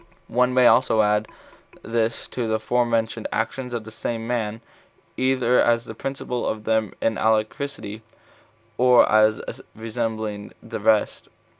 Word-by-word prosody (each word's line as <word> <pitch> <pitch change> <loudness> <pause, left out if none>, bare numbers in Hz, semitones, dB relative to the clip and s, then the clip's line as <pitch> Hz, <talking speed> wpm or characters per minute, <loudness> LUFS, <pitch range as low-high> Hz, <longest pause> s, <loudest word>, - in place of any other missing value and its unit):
One 125 +1 +3
may 125 0 +4
also 120 -3 +5
add 105 +1 +1 0.6
this 115 0 -1
to 120 -3 -3
the 110 0 0
forementioned 115 -1 0
actions 130 -2 -2
of 120 -2 -3
the 110 - -11
same 115 +1 -4
man, 115 -2 -2 0.5
either 130 -1 +2
as 120 0 +2
the 110 - -7
principal 125 0 -4
of 110 -1 -3
them 110 -1 0
in 115 - +1
alacrity, 110 0 -1 0.8
or 125 -1 +6
as 110 0 +2
resembling 110 -2 -4
the - - -6
rest. 110 0 +1
115 Hz, 135 wpm, -23 LUFS, 110-125 Hz, 0.8 s, or